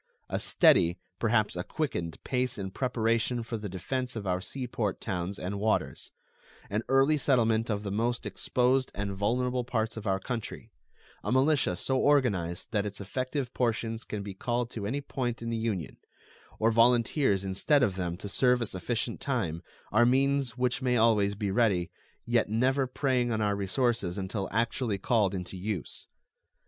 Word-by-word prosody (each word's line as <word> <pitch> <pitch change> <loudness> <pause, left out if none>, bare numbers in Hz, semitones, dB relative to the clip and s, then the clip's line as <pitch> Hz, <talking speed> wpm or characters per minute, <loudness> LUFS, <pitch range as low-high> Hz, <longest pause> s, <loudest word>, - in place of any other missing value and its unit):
A - - -1
steady, 85 +1 +4 0.2
perhaps 110 -3 +2
a 90 - -2
quickened, 85 - -3
pace 125 -1 -1
in 95 -2 -4
preparation 115 0 0
for 115 +1 -5
the 105 -1 -5
defense 125 +8 -3
of 105 -3 -5
our 90 -1 0
sea 130 +6 -5
port 110 -4 -2
towns 95 -1 -3
and 100 +2 -4
waters; 110 +1 -1 0.6
an 105 +2 +1
early 135 +3 +4
settlement 115 -5 +2
of 105 -1 -1
the 100 - -3
most 115 +4 -1
exposed 130 +1 +1
and 100 0 -2
vulnerable 125 +5 0
parts 115 -2 -2
of 110 -1 -5
our 95 0 +1
country; 115 +1 -5 0.5
a - - -2
militia 130 - +3
so 130 +8 0
organized 100 -13 +1
that 105 -2 +1
its 105 -1 -6
effective 130 +5 -3
portions 115 -1 -1
can 105 -1 -5
be 100 -1 -6
called 120 +4 -2
to 100 -4 -4
any 140 +6 -2
point 125 -4 -3
in 115 - -3
the - - 0
Union, 110 - -3 0.6
or 115 +1 +3
volunteers 115 -2 +3
instead 115 +10 +2
of 100 -7 +1
them 90 -2 -3
to 100 - -7
serve 125 +4 +3
a 120 - -1
sufficient 115 +4 -3
time, 90 - -1 0.3
are 110 +3 +5
means 135 0 +2
which 125 +1 0
may 125 -1 +2
always 105 -3 +3
be 100 -1 -2
ready, 95 -6 +2 0.3
yet 120 -3 +2
never 130 +5 +2
preying 125 -2 0
on 110 - 0
our 105 -1 +1
resources 100 -2 0
until 95 +1 -3
actually 115 0 0
called 100 -1 +1
into 90 0 -5
use. 95 -2 -4
115 Hz, 170 wpm, -29 LUFS, 100-125 Hz, 0.6 s, are